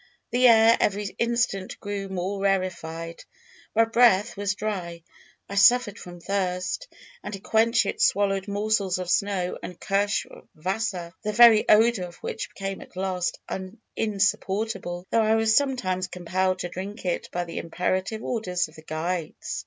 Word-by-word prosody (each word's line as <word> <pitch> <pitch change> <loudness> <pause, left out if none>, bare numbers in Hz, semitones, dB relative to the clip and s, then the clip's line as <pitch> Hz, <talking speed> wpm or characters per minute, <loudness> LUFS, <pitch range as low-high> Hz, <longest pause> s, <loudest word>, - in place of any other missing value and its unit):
The 250 +1 +5
air 225 0 +6
every 205 0 -1
instant 235 -5 -1
grew 200 -1 -5
more 190 +1 -3
rarefied; 170 -4 -2 0.5
my 225 +1 +5
mouth 235 -2 +5
was 205 0 -1
dry; 180 -6 -4 0.4
I - - -8
suffered 205 +1 +4
from 175 -1 -10
thirst, 180 -1 -2 0.4
and 205 0 -5
to - - -9
quench 225 +2 +2
it - - -3
swallowed 195 0 +2
morsels 205 -2 0
of 180 -1 -3
snow 195 -3 0
and 180 - -8
kirsch 200 +1 0 0.3
wasser, 185 0 -3
the 210 -1 -3
very 230 -1 +7
odour 220 -3 +5
of 175 - -13
which - - -5
became 195 -1 -5
at - - -14
last 185 -2 -2 0.6
insupportable, 200 -3 -1
though 230 - +4
I 220 0 +3
was 225 0 +3
sometimes 190 -10 +1
compelled 185 +1 -1
to 175 - -4
drink 195 +4 -7
it 175 - -2
by 175 - -2
the 170 -1 -6
imperative 185 +5 -2
orders 180 -7 -1
of - - -19
the - - -11
guides. 160 +2 -4
195 Hz, 155 wpm, -25 LUFS, 180-215 Hz, 0.6 s, very